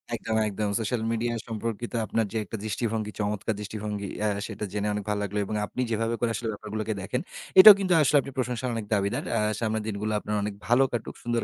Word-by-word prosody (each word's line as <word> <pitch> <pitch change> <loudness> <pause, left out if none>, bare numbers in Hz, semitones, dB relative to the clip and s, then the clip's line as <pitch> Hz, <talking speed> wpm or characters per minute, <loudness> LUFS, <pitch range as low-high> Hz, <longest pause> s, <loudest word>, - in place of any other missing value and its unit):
একদম, 110 0 -3
একদম। 105 +1 -2
Social 115 +1 -1
media 120 +1 0
সম্পর্কিত 115 +1 -4
আপনার 115 0 0
যে 115 - -2
একটা 110 - -6
দৃষ্টিভঙ্গি, 110 0 -2
চমৎকার 105 +1 -1
দৃষ্টিভঙ্গি 105 -1 -4 0.2
আ - - +3 0.2
সেটা 105 - -5
জেনে 105 0 -1
অনেক 105 -1 -3
ভালো 105 -1 0
লাগলো। 100 +1 -3
এবং 105 - -4
আপনি 125 - -4
যেভাবে 115 +1 0
করে 120 - +1
আসলে 115 - -3
ব্যাপারগুলোকে 110 +1 -4
দেখেন, 125 +7 -2 0.4
এটাও 210 +2 +13
কিন্তু 185 -2 +2
আসলে 145 0 +4 0.2
প্রশংসার 125 0 -1
অনেক 110 -2 -3
দাবিদার। 100 +3 0
আ - - +2 0.2
সামনের 110 -1 -1
দিনগুলা 105 +1 -2
আপনার 105 +1 -3
অনেক 105 -1 -2
ভালো 125 +3 +5
কাটুক, 120 -2 -4
সুন্দর 120 -1 0
110 Hz, 200 wpm, -27 LUFS, 105-120 Hz, 0.4 s, এটাও